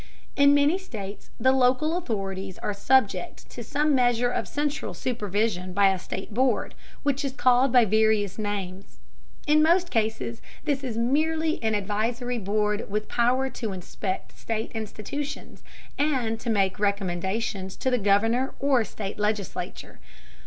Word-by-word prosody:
In 280 0 +6
many 290 +6 +3
states 210 - -8
the 260 +3 +4
local 265 +5 +3
authorities 195 - -3
are 210 - -3
subject 200 -4 +1
to 240 - -7
some 295 +5 +1
measure 245 -2 +3
of - - -2
central 290 0 -2
supervision 205 -5 -1
by 200 +1 +5
a 190 - -2
state 190 +3 -6
board, 250 0 +1 0.3
which 285 0 0
is 275 -2 -2
called 255 0 +4
by 245 -2 +6
various 215 -1 +2
names. 200 -2 -4 0.5
In 305 0 +4
most 345 +3 +3
cases 215 - -1 0.2
this 285 -3 0
is 240 -4 -3
merely 315 +6 +1
an 220 -2 +1
advisory 230 +5 -1
board 210 +1 -1
with 210 +1 -2
power 250 +2 +2
to 220 -5 -4
inspect 185 +1 -5
state 225 0 -3
institutions, 225 +6 -6 0.4
and 255 -7 +1
to 235 - -4
make 195 -3 +1
recommendations 195 0 -1
to 260 - -1
the 250 - +2
governor 225 +6 +2
or 270 -4 +3
state 205 -2 -6
legislature. 210 -2 -3
225 Hz, 145 wpm, -26 LUFS, 205-265 Hz, 0.5 s, In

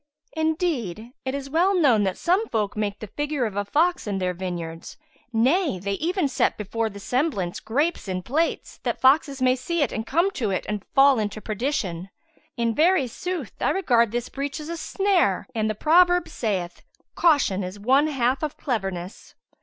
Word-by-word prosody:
Indeed, 310 - -1
it 260 +1 -2
is 275 -1 -5
well 345 +7 +2
known 240 -10 +4
that 190 -1 -1
some 375 +6 +1
folk 210 -3 -1
make 205 -1 -2
the - - -4
figure 290 +3 -2
of 210 -3 -4
a 205 - 0
fox 320 - +1
in 200 -2 -1
their 185 -1 -1
vineyards; 170 -2 -6 0.3
nay, 265 - +2
they 195 +2 -4
even 335 - 0
set 270 - +1
before 220 +2 -2
the 200 -1 -10
semblance 200 - -1
grapes 290 +6 -1
in 185 -1 -3
plates, 315 - -1
that - - -2
foxes 275 0 +3
may 255 0 +4
see 310 +5 -1
it 265 - -1
and 220 +1 -4
come 340 +7 +2
to 230 - -2
it 185 - -2
and 210 -2 -3
fall 275 -2 +6
into 210 0 -3
perdition. 210 - -3 0.5
In 230 -1 +1
very 330 +2 +3
sooth 355 +9 -5
I - - +2
regard 235 - +2
this 240 +1 -2
breach 280 +2 -4
as 305 +1 -7
a 335 - -4
snare 370 - +1
and 220 -1 0
the 215 - -2
proverb 355 - +4
saith, 185 -6 -3 0.3
'Caution 285 - +3
is 185 +3 -6
one 265 +8 +3
half 265 -3 0
of 305 -2 -3
cleverness.' 195 - -4
250 Hz, 185 wpm, -24 LUFS, 205-310 Hz, 0.5 s, fall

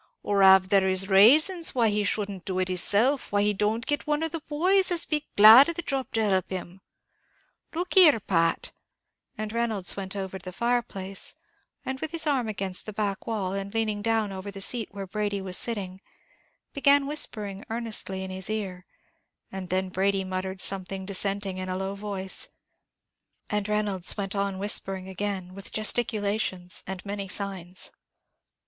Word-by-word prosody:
or 200 -1 +1
av 190 -1 +6
there 190 -1 +3
is 190 +1 -1
rasons 305 - +5
why 235 -3 +3
he 210 0 0
shouldn't 200 -2 -2
do 185 -1 -4
it 185 0 -1
hisself, 210 +9 +2
why 205 +1 +2
don't 210 +3 -1
he - - -12
get 290 0 -1
one 300 +1 0
of 325 - -1
the 330 -1 -4
boys 370 +6 +3
as'd 345 -2 +2
be 300 -1 -1
glad 225 +8 +9
of 335 - 0
the 345 - -5
job 270 -4 -3
to 220 -1 0
help 190 -2 0
him. 185 0 -6 0.9
Look 355 +2 -3
here, 320 -10 +7
Pat 165 -4 0 0.3
" - - -44
and 215 0 -5
Reynolds 225 -5 0
went 195 0 -5
over 190 -1 -5
to - - -20
the 185 - -6
fire 240 +4 0
place, 195 -4 -5 0.5
and 265 0 -4
with 315 - -4
his 330 -1 0
arm 270 -6 0
against 195 -3 -2
the 215 - -5
back 200 -2 -3
wall 200 -5 -2
and 195 +2 -5
leaning 215 -2 -1
down 220 -2 0
over 190 +1 -7
the 200 0 -8
seat 225 +3 -1
where 195 -1 -7
Brady 205 +1 -3
was 190 -1 -4
sitting, 195 -5 -1 0.7
began 280 0 +4
whispering 210 -9 -2
earnestly 220 -4 -1
in 190 - -6
his 185 +1 -5
ear; 190 -4 -4 0.6
and 190 -2 -7
then 185 0 -1
Brady 195 +1 0
muttered 190 0 -4
something 190 0 0
dissenting, 195 0 -1
in 185 0 -4
a 185 - -2
low 190 +1 -3
voice; 200 -2 -3 1.0
and 210 0 -1
Reynolds 210 -4 0
went 195 -1 -3
on 200 -1 -1
whispering 195 -1 0
again, 190 -1 -5
with 195 0 -5
gesticulations, 210 -5 -1
and 190 +1 -6
many 200 -1 -5
signs. 185 -2 -5
200 Hz, 180 wpm, -26 LUFS, 190-225 Hz, 1.0 s, glad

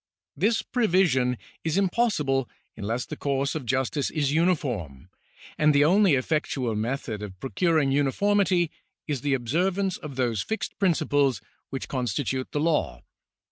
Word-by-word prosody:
This 215 +9 +1
prevision 175 - +2 0.3
is 160 +2 0
impossible 180 - +1 0.3
unless 115 +4 -3
the - - -6
course 140 0 -1
of 150 -6 -5
justice 130 +3 0
is 145 -3 0
uniform, 120 - -1 0.5
and 150 -1 +4
the 145 +1 +5
only 190 -1 +5
effectual 130 -3 -1
method 110 -1 -3
of 95 -3 -8
procuring 155 - +1
uniformity 175 +5 +2 0.4
is 145 -5 -2
the 140 0 +1
observance 180 - 0
of 145 -3 -8
those 120 -5 0
fixed 220 - -4
principles 145 - +2 0.3
which 135 - -5
constitute 130 0 -2
the 145 - -1
law. 150 - 0
145 Hz, 135 wpm, -26 LUFS, 130-175 Hz, 0.5 s, the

